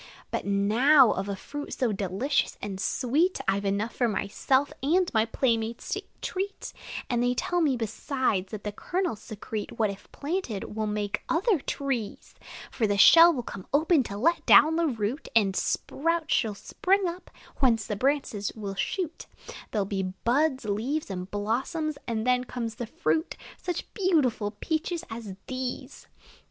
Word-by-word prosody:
But - - -3
now, 225 +7 +5
of 195 +1 -2
a 200 - -2
fruit 290 +9 -7
so 250 -4 0
delicious 200 +8 0
and 195 -2 -5
sweet 295 - +1
I 195 +1 +2
've 200 - -7
enough 200 +3 -1
for 245 - +2
myself 260 +6 0
and 345 +6 +2
my 220 -1 +3
playmates 230 -1 -1
a - - -3 0.2
treat; 390 +2 -4 0.3
And 240 -2 0
they 245 0 +2
tell 350 +7 0
me, 280 -6 +2
besides, 225 -3 -1
that 215 -2 -6
the 210 - -3
kernels 345 - -2
secrete 215 -1 -6
What, 215 -3 +2
if 195 - -13
planted, 280 - -4
will 215 -1 -1
make 210 -1 -2
other 375 +2 +2
trees: 270 -6 -3 0.4
For 225 - 0
the 205 0 +1
shell 335 +10 +9
will 255 -7 -3
come 195 -5 -8
open 315 0 +4
to 200 - -5
let 335 +11 +2
down 315 +1 +7
the 335 0 +2
root; 235 +2 -2
A 205 -4 +5
sprout 330 - 0
will 215 -2 -4
spring 380 - +1
up, 345 +2 -6 0.3
whence 230 -6 +3
the 210 - -3
branches 250 -4 0
will 205 -3 -5
shoot; 330 - -3 0.4
There 210 -3 0
'll - - -5
be 195 0 -2
buds, 250 +9 0
leaves, 225 +7 -2
and 180 0 -5
blossoms; 260 +10 -2
and 225 -2 -1
then 250 0 +2
comes 235 -3 -4
the 235 0 -6
fruit 320 - -1 0.2
Such 355 - -4
beautiful 300 - +2
peaches 320 - -3
as 225 -4 -6
these! 255 -1 -5
240 Hz, 165 wpm, -27 LUFS, 210-310 Hz, 0.4 s, shell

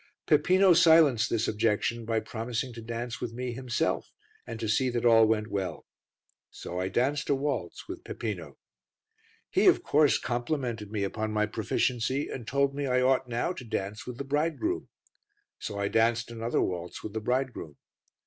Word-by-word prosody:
Peppino 180 +5 +5
silenced 160 -9 +5
this 115 0 0
objection 110 +2 0
by 115 0 +1
promising 120 +3 -4
to 115 - -8
dance 115 +1 -5
with 115 - -4
me 125 +1 -4
himself, 125 -1 -2 0.4
and 115 0 -6
to 115 - -2
see 110 +5 +2
that 120 -1 -2
all 115 -2 +7
went 110 -1 +1
well. 95 -2 -3 0.6
So 90 - -6
I 95 - -1
danced 135 +8 0
a 140 - +4
waltz 135 - -3
with - - -7
Peppino. 90 - -5 0.9
He, - - +3
of - - +5
course, 150 -1 +4
complimented 120 -3 -3
me 105 -2 -1
upon 110 +2 -2
my 105 0 +1
proficiency, 120 +5 -1
and 120 -4 -7
told 140 0 +1
me 140 0 -2
I 125 0 +2
ought 130 -1 +2
now 120 +9 -1
to 135 - -9
dance 105 -2 -4
with 125 -1 -6
the 140 - -4
bridegroom. 160 - -1 0.7
So 105 - -5
I 100 0 0
danced 115 +2 +1
another 115 +1 -1
waltz 90 -1 -4
with 105 - -6
the 110 - -3
bridegroom. 125 - -2
120 Hz, 170 wpm, -28 LUFS, 110-135 Hz, 0.9 s, all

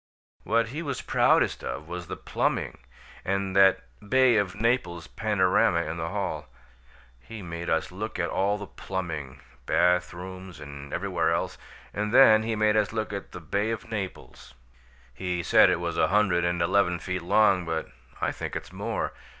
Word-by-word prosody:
What 115 +1 +1
he 150 +6 -5
was 140 -5 -3
proudest - - +2
of - - -5
was - - -6
the - - -5
plumbing - - -2 0.4
and 95 0 -1
that 95 -1 +5 0.3
Bay 130 -2 +5
of 100 -2 0
Naples 105 -7 0
panorama 95 -5 +2
in 80 +1 -5
the 80 0 -3
hall. - - -3 0.7
He 105 - -10
made 85 0 -5
us 80 +1 0
look 110 +4 -5
at 85 - -1
all 100 +2 +1
the 100 - -7
plumbing 80 -10 -5 0.3
bath 90 0 +3
rooms 95 0 -9
and 70 -1 -9
everywhere 90 -3 0
else 85 - -2 0.3
and 105 +1 -2
then 110 -4 +7
he 110 0 -2
made 105 0 +2
us 105 -2 +2
look 110 -2 -3
at 100 - -6
the 90 - -8
Bay 100 +6 -1
of 115 0 -5
Naples. 100 -4 -6 0.6
He 90 +4 -3
said - - +6
it - - +1
was - - -3
a - - +4
hundred 100 -4 +2
and 85 0 0
eleven 90 0 +2
feet 90 +2 -4
long, 95 +1 +3
but 80 -1 -3 0.3
I - - 0
think - - -6
it's - - -6
more. - - -3
95 Hz, 175 wpm, -27 LUFS, 85-105 Hz, 0.7 s, then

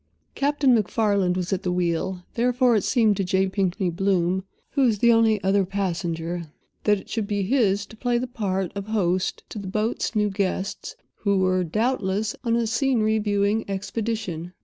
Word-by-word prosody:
Captain 280 -2 +2
MacFarland 200 -4 +1
was 180 +1 -2
at 190 - -1
the 180 - -1
wheel; 180 +1 -1
therefore 245 0 +3
it 205 - +1
seemed 225 -5 +3
to 195 - -1
J. 190 +1 +1
Pinkney 190 -1 -1
Bloom, 185 0 +1 0.3
who 280 - 0
was 235 -5 +3
the 235 +3 +5
only 225 -2 +4
other 195 +1 +3
passenger, 175 -3 -3 0.4
that 210 -1 +4
it - - -15
should 220 -3 -2
be 205 -1 -1
his 200 -3 +2
to - - -14
play 245 +1 0
the 245 - -1
part 195 -7 -2
of 200 0 -6
host 185 -4 0
to 215 - -6
the 200 - -7
boat's 215 +4 -1
new 210 -1 +2
guests, 195 0 -3 0.2
who 200 -2 +1
were, 185 -1 +2
doubtless, 210 +1 -1
on 230 -2 +1
a 235 0 +1
scenery 225 -2 +1
viewing 205 +1 +1
expedition. 195 -3 -3
200 Hz, 175 wpm, -24 LUFS, 185-225 Hz, 0.4 s, the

